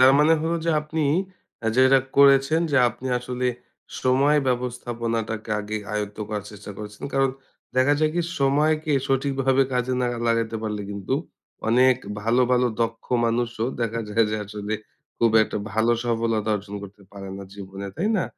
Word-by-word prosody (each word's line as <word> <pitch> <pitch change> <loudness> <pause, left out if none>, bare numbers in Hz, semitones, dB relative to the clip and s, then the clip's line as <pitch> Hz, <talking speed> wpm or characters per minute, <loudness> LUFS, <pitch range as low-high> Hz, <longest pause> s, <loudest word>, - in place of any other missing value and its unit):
তার 130 +1 +8
মানে 150 +2 +5
হলো 165 +1 0
যে 165 - +2
আপনি 155 +1 -3 0.6
অ্যা 115 - -1
যে 130 - +4
এটা 135 0 +6 0.2
করেছেন 140 +3 +6
যে 140 - +2
আপনি 120 +3 -8
আসলে 125 +1 -3 0.6
সময় 135 +4 +4
ব্যবস্থাপনাটাকে 115 -3 -2
আগে 105 +1 -4 0.2
আয়ত্ত 105 -1 -3
করার 105 -2 -3
চেষ্টা 105 0 -10
করেছেন। 105 -1 -8
কারণ 135 -1 +2 0.5
দেখা 130 +3 +4
যায় 155 0 +3
কি? 175 - +2 0.2
সময়কে 150 +2 +2 0.2
সঠিকভাবে 135 0 +2
কাজে 125 0 0
না 125 - +1 0.2
লাগাইতে 115 -1 +1
পারলে 105 -1 -3
কিন্তু 100 +5 -2 0.5
অনেক 125 +2 +5 0.3
ভালো, 120 +4 +3
ভালো 125 0 +4
দক্ষ 115 0 -1 0.2
মানুষও 115 0 0
দেখা 115 0 -1
যায় 115 +2 +3
যে 110 - -1
আসলে 105 +1 -4 0.4
খুব 115 - +4
একটা 105 - -3
ভালো 110 +2 +3
সফলতা 115 -2 0
অর্জন 100 +1 -9
করতে 100 0 -11
পারে 100 -1 -8
না 100 - -7
জীবনে। 100 0 -7
তাই 200 - 0
না? 185 - +1
120 Hz, 165 wpm, -24 LUFS, 110-135 Hz, 0.6 s, তার